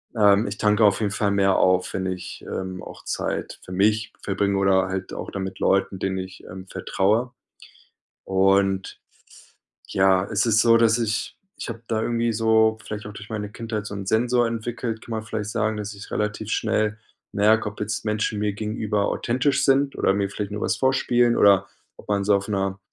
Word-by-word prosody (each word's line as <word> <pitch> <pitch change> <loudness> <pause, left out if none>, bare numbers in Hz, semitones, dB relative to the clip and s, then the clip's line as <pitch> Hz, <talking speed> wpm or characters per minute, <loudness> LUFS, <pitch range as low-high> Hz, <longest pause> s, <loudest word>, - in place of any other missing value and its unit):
ähm, 105 -1 +5
ich - - -5
tanke 105 +1 +3
auf 100 +1 +3
jeden 105 -2 0
Fall 100 0 0
mehr 100 -1 +3
auf, 95 0 +2
wenn 95 -1 -2
ich, 90 0 -6
ähm, 95 -1 -5
auch - - -11
Zeit - - -3
für - - -10
mich 105 +3 +1
verbringe 100 0 0
oder 95 -1 +3
halt 95 0 -4
auch - - -6
dann 95 - -4
mit 95 - -6
Leuten, 95 0 +1
denen 95 0 -1
ich, 95 0 -8
ähm, 95 0 -9
vertraue. 110 +8 0 0.9
Und, 95 0 +1 0.9
ja, 95 0 +3
es - - +1
ist 110 -1 +4
so, 115 -1 +5
dass 115 0 +4
ich 110 -1 -1 0.3
ich - - -5
habe 115 0 -7
da 110 -1 0
irgendwie 115 0 0
so, 110 0 +3
vielleicht 105 0 -6
auch 105 - -8
durch 105 0 -10
meine 105 -2 -4
Kindheit, 110 -1 -5
so 100 - -6
'n 100 -1 -6
Sensor 120 +3 +2
entwickelt, 115 0 -4
kann - - -13
man 110 0 -2
vielleicht 105 -1 -4
sagen, 110 -1 -1
dass 105 0 -5
ich 100 +1 -11
relativ 105 0 -2
schnell 110 -1 0 0.3
merke, 110 +2 +3
ob 105 - -15
jetzt 105 +1 -3
Menschen 105 0 -1
mir 105 -1 0
gegenüber 105 -1 -1
authentisch 130 +3 0
sind 140 +1 +2
oder - - +2
mir 100 -1 0
vielleicht 105 0 -4
nur 105 - -4
was - - 0
vorspielen 120 -2 +2
oder 100 -1 +5 0.3
ob - - -16
man 100 -1 +1
so 105 - +4
auf 100 +2 -4
'ner 95 -1 -1
105 Hz, 195 wpm, -24 LUFS, 95-110 Hz, 0.9 s, ähm